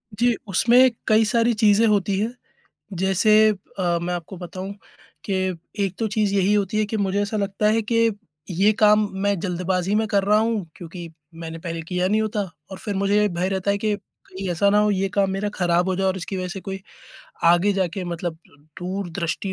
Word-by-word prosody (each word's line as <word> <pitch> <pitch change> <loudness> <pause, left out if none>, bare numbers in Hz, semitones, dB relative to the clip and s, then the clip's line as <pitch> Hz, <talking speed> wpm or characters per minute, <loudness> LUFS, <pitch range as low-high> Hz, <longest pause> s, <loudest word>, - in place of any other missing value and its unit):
जी, 240 +1 +2
उसमें 245 +7 +5 0.2
कई 220 0 +4
सारी 230 +2 +2
चीज़ें 215 +1 +4
होती 200 -2 +1
हैं। 225 +3 -1 0.7
जैसे 215 +3 +4 0.3
अ, 175 -2 +1
मैं 180 +1 -2
आपको 175 +2 -7
बताऊँ 185 +2 -7 0.5
कि 200 - -3 0.5
एक 190 -1 -3
तो 225 - 0
चीज़ 210 -1 0
यही 195 +1 +2
होती 205 +1 0
है 215 - +2
कि 220 - -3
मुझे 200 0 0
ऐसा 205 +2 -2
लगता 200 +1 -1
है 225 +1 +2
कि 230 +1 +2 0.4
ये 195 +5 +3
काम 210 -1 +5
मैं 200 -2 +1
जल्दबाज़ी 180 +1 -1
में 220 +1 +2
कर 200 -1 +1
रहा 210 +1 +4
हूँ 220 -5 0
क्योंकि 170 0 -8 0.3
मैंने 165 0 -7
पहले 165 -1 -5
किया 180 0 0
नहीं 215 +2 +2
होता 215 -1 -2 0.3
और 190 - -7
फिर 205 -2 -4
मुझे 205 +2 +2
भय 180 +1 -1
रहता 195 +1 -1
है 200 - +1
कि 215 0 0
कहीं 190 -1 -10
ऐसा 200 +4 +2
ना 205 - +4
हो, 210 0 +3
यह 195 0 0
काम 195 -1 +2
मेरा 195 +2 -2
खराब 175 0 +1
हो 185 - +1
जाए 190 0 0
और 190 0 +1
इसकी 190 +1 -5
वज़ह 185 0 -3
से 190 +2 -6
कोई 195 0 -6 0.6
आगे 175 +4 +5
जाके 190 -1 -2
मतलब 170 -1 -4 0.4
दूरदृष्टि 185 0 -3
195 Hz, 200 wpm, -23 LUFS, 180-210 Hz, 0.7 s, उसमें